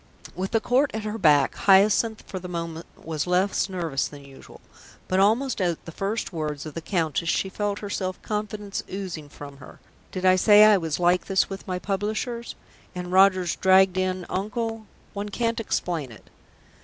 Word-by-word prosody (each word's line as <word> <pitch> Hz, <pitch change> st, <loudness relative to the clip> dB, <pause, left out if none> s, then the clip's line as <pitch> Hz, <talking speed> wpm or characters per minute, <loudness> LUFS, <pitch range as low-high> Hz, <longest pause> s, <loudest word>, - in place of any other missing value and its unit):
With 190 Hz, +2 st, -3 dB
the 225 Hz, -, +2 dB
Court 255 Hz, +5 st, +2 dB
at 220 Hz, -, -3 dB
her 215 Hz, +1 st, -4 dB
back, 145 Hz, -6 st, +4 dB
Hyacinth 205 Hz, +3 st, +3 dB
for 185 Hz, -, -6 dB
the 180 Hz, -, -8 dB
moment 170 Hz, -2 st, -5 dB
was 160 Hz, 0 st, -4 dB
less 185 Hz, +2 st, +1 dB
nervous 165 Hz, -7 st, -2 dB
than 145 Hz, -1 st, -12 dB
usual, 135 Hz, -1 st, -14 dB, 0.5 s
but 185 Hz, -, +1 dB
almost 225 Hz, +4 st, +2 dB
at 175 Hz, -3 st, -1 dB
the 165 Hz, -, -8 dB
first 200 Hz, +4 st, -3 dB
words 155 Hz, -2 st, -4 dB
of 155 Hz, -, -7 dB
the 165 Hz, -, -5 dB
Countess 165 Hz, -2 st, -1 dB
she 190 Hz, -, 0 dB
felt 205 Hz, +1 st, -2 dB
her 205 Hz, -, -6 dB
self 185 Hz, -2 st, -3 dB
confidence 210 Hz, -1 st, -4 dB
oozing 180 Hz, -6 st, -6 dB
from 140 Hz, -1 st, -11 dB
her. 130 Hz, -, -14 dB, 0.3 s
Did 185 Hz, 0 st, -4 dB
I 185 Hz, 0 st, +6 dB
say 210 Hz, +2 st, +7 dB
I 215 Hz, -2 st, +6 dB
was 160 Hz, -2 st, -3 dB
like 180 Hz, +1 st, +2 dB
this 195 Hz, 0 st, +1 dB
with 195 Hz, +1 st, -7 dB
my 185 Hz, -1 st, -2 dB
publishers? 215 Hz, +5 st, -3 dB, 0.4 s
And 180 Hz, 0 st, -5 dB
Roger's 185 Hz, -2 st, +4 dB
dragged 190 Hz, 0 st, +4 dB
in 185 Hz, -1 st, -1 dB
Uncle 225 Hz, +2 st, -3 dB, 0.3 s
one 205 Hz, 0 st, -4 dB
can't 230 Hz, +2 st, -1 dB
explain 170 Hz, -, -2 dB
it. 110 Hz, -, -16 dB
185 Hz, 180 wpm, -25 LUFS, 170-210 Hz, 0.5 s, say